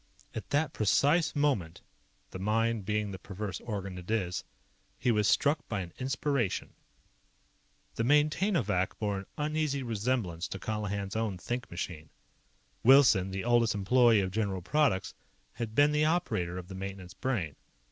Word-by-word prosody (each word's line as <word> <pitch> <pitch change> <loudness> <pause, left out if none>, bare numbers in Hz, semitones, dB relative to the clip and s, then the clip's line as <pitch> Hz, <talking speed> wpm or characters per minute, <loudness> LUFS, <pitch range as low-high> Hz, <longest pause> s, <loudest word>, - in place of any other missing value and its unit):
At 110 - -6
that 145 +1 +1
precise 145 - +2
moment, 135 - 0 0.5
the 95 - -6
mind 110 +1 0
being 105 0 -1
the 95 - -7
perverse 100 +1 -5
organ 100 -5 -5
it 90 - -12
is, 95 -5 -1 0.5
he 125 - +1
was 105 -2 +2
struck 145 +5 +3
by 105 -3 -1
an 85 -2 -8
inspiration. 135 -4 -1 1.2
The 115 - -1
Maintainovac 145 - +2
bore 105 -2 -1
an 95 - -9
uneasy 150 -2 -1
resemblance 110 -7 -1
to - - -5
Colihan's 100 -1 -3
own 110 -4 -1
think 120 +7 -4
machine. 85 -3 -6 0.7
Wilson, 125 -7 +6
the 95 0 -4
oldest 120 -2 +3
employee 115 +2 +4
of 95 -1 -2
General 100 -3 -1
Products, 140 - +1 0.4
had 115 -2 -5
been 145 +2 +5
the 150 0 +2
operator 110 - 0
of 90 -1 -7
the 95 - -8
maintenance 95 -1 -7
Brain. 100 - -2
110 Hz, 145 wpm, -30 LUFS, 95-130 Hz, 1.2 s, Wilson